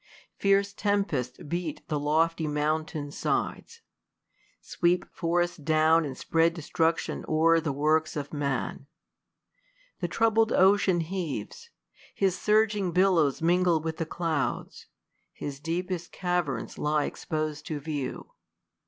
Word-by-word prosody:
Fierce 200 0 +2
tempests 195 - -1
beat 165 -1 -4
the 150 - -1
lofty 160 +2 +1
mountains' 150 0 -2
side:;, - - -1 0.9
Sweep 175 +1 0
forests 175 +1 0
down, 155 +1 +3
and 135 -3 -6
spread 165 +1 +2
destruction 165 0 -1
o'er 165 +1 +4
The 160 -2 -2
works 155 +3 +1
of 145 -1 -5
man. 140 -1 -2 1.1
The 175 - -1
troubled 225 +4 +2
ocean 190 -2 +4
heaves: 180 - -5 0.5
His 190 -2 +1
surging 210 -2 +2
billows 170 -6 +3
mingle 175 -1 +3
with 160 0 -4
the 165 - -3
clouds: 160 -4 -3 0.5
His 140 -2 -6
deepest 175 +3 -3
caverns 175 -6 -2
lie 150 0 +1
expos'd 155 -2 -4
to 155 -2 -3
view. 145 -2 -5
165 Hz, 115 wpm, -28 LUFS, 150-180 Hz, 1.1 s, o'er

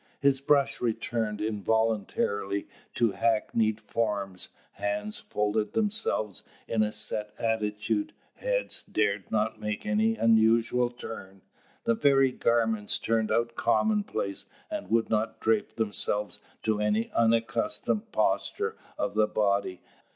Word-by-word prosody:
His 140 -1 +3
brush 140 -1 +2
returned 110 -2 -1
involuntarily 105 -2 0 0.3
to 115 -3 +3
hackneyed 110 0 +1
forms: 100 -6 -2 0.2
hands 105 +1 -3
folded 105 +1 -1
themselves 210 - +1 0.3
in 110 - +1
a 105 0 +2
set 105 0 0
attitude; 110 - -1 0.3
heads - - 0
dared 100 -2 -1
not 110 0 0
make 105 -1 -3
any 110 +2 +2
unusual 115 +2 +3
turn; 100 -6 -9 0.4
the 115 - +3
very 135 +1 +4
garments 115 -4 +1
turned 110 -1 0
out 115 0 +1
commonplace, 205 - 0 0.2
and - - -4
would 115 +1 +1
not 110 +1 0
drape 110 -1 +1
themselves 105 -1 0 0.2
to 110 -1 +1
any 105 +1 0
unaccustomed 115 - +1
posture 445 - 0 0.2
of 305 - -1
the 110 0 +3
body. 100 -3 0
110 Hz, 115 wpm, -28 LUFS, 105-115 Hz, 0.4 s, very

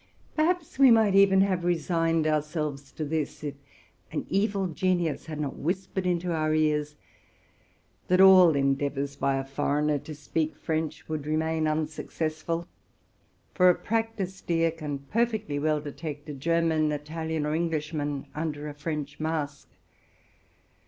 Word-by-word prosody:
Perhaps 325 -2 0
we 270 -2 +8
might 220 -4 +5
even 195 -1 +6
have 185 -3 +1
resigned 165 -1 +1
ourselves 150 -2 -2
to 155 - -4
this, 155 0 -3
if 145 -2 -3 0.6
an - - -3
evil 200 0 +1
genius 175 -3 -1
had 155 -1 -5
not 145 -3 -3
whispered 185 +3 -2
into 175 0 0
our 155 -1 +1
ears 150 -1 +1 1.1
that 185 0 +3
all 185 -5 +8
en 135 0 +3
deavors 140 0 -3
by 140 -1 +1
a 135 - -3
foreigner 145 +2 0
to 155 +2 -9
speak 155 +1 -2
French 160 0 -3
would 155 -2 -4
remain 160 0 0
un 155 0 +1
successful; 160 +2 -4 0.9
for 180 0 +5
a 180 - +5
practised 220 -5 -3
ear 165 -1 +3
can 150 -3 -5
perfectly 215 - -1
well 155 +1 +1
detect 150 0 -7
a - - -4
German, 160 +1 +1
Italian, 155 +1 -3
or 150 - -1
Englishman 150 -3 -2
under 150 -1 -3
a 150 - -6
French 150 -1 -5
mask. 155 -3 -3
155 Hz, 145 wpm, -27 LUFS, 150-175 Hz, 1.1 s, we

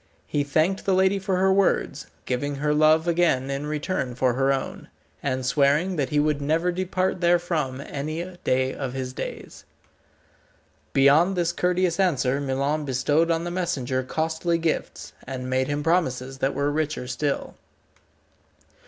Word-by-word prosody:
He 145 - -1
thanked 155 +7 +1
the 195 - +3
lady 190 +1 +3
for 190 -1 -1
her 190 +1 +3
words, 195 0 +1 0.2
giving 140 +3 -2
her 150 +2 0
love 155 +2 +4
again 165 -6 +2
in 140 +2 -3
return 150 -4 -2
for 125 -1 +2
her 135 +2 +2
own, 135 -1 -3 0.3
and 130 -2 -2
swearing 145 +7 +2
that 140 -5 -1
he 150 - +1
would 150 -1 +1
never 160 +5 +1
depart 185 0 -1
therefrom 170 -6 +1
any 155 +4 -4 0.2
day 130 +1 +1
of 135 -3 -4
his 130 -1 -4
days. - - -7 1.3
Beyond 150 +8 +4
this 170 -1 +1
courteous 180 0 0
answer 140 -7 +1
Milon 140 +3 -1
bestowed 145 +5 +1
on 165 0 +1
the 175 - -4
messenger 145 -8 -1
costly 160 +5 -1
gifts, 165 -1 -3
and 130 -1 -5
made 130 0 0
him 145 0 -2
promises 135 -6 0
that 135 +1 0
were 140 +1 0
richer 150 -3 -2
still. 140 +3 -2
150 Hz, 155 wpm, -24 LUFS, 135-175 Hz, 1.3 s, love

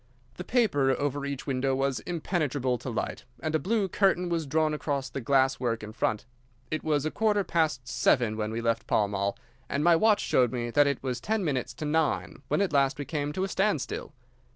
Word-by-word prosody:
The 180 - -5
paper 190 - +2
over 145 0 -1
each 140 -2 -5
window 135 -1 0
was 135 -1 0
impenetrable 150 -7 -1
to - - -6
light, 115 - -3 0.2
and 155 +5 -3
a 155 - +3
blue 205 +5 0
curtain 185 -1 +2
was 165 -3 -1
drawn 155 +2 +1
across 140 -3 -2
the 135 - -4
glass 135 +1 +2
work 115 -3 -1
in 105 0 -7
front. 110 -2 -1 0.5
It 155 - -2
was 150 -2 +1
a 155 - -1
quarter 210 -2 +2
past 155 -8 0
seven 115 -2 +2
when 105 -1 -2
we 115 +1 -3
left 115 0 0
Pall 105 - +2
Mall, 100 0 -2 0.3
and 140 - 0
my 170 0 +6
watch 210 +4 +4
showed 125 -3 +2
me 120 -1 -3
that 145 +3 +4
it 140 -2 -1
was 125 -3 -3
ten 220 -1 0
minutes 135 -5 -2
to 155 - -5
nine 150 -2 0
when - - +1
we - - +5
at 190 - -2
last 140 -1 +3
came 145 -1 -2
to 185 - -1
a - - 0
standstill. 195 +3 -1
145 Hz, 215 wpm, -28 LUFS, 125-165 Hz, 0.5 s, my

